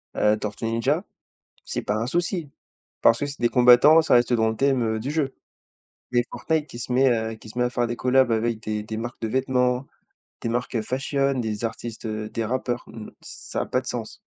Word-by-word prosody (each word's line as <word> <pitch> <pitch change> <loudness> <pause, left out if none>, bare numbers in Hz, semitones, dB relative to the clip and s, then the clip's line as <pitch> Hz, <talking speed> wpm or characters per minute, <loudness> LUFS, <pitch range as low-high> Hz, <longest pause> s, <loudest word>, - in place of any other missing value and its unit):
heu, 105 +1 +3
Tortues 105 +1 -5
Ninja, 130 - 0 0.6
c'est - - -3
pas 105 - -1
un 110 +2 -1
souci 170 0 -1 0.5
parce 115 - +5
que - - -1
c'est 140 0 -8
des 120 -1 +2
combattants 125 +6 +7
ça 160 - +3
reste 120 +1 +3
dans 110 -1 +3
le 110 - -3
thème, 135 +1 +2
heu, 110 -1 -1
du 135 +6 -3
jeu. 150 -4 -1 0.8
Mais 120 0 +4
Fortnite 160 -2 -1
qui 120 - -10
se 125 - -4
met, 130 +1 +4
heu, 110 -1 0
qui 110 0 -14
se 120 - -8
met 125 - +3
à 125 - 0
faire 120 -1 0
des 120 - -4
collabs 130 0 +3
avec 115 0 0
des 105 0 -3
des 110 +1 -6
marques 120 +2 -6
de 110 - -2
vêtements, 125 +1 +1 0.6
des 115 - -2
marques 120 0 -1
fashion, 135 +3 0
des 110 -1 -2
artistes, 115 0 -6
heu, 110 0 -4
des 115 - -3
rappeurs, 120 0 -2
mmh, 110 -2 -9
ça - - -6
a - - -2
pas - - 0
de - - -13
sens. - - -5
120 Hz, 220 wpm, -24 LUFS, 110-130 Hz, 0.8 s, combattants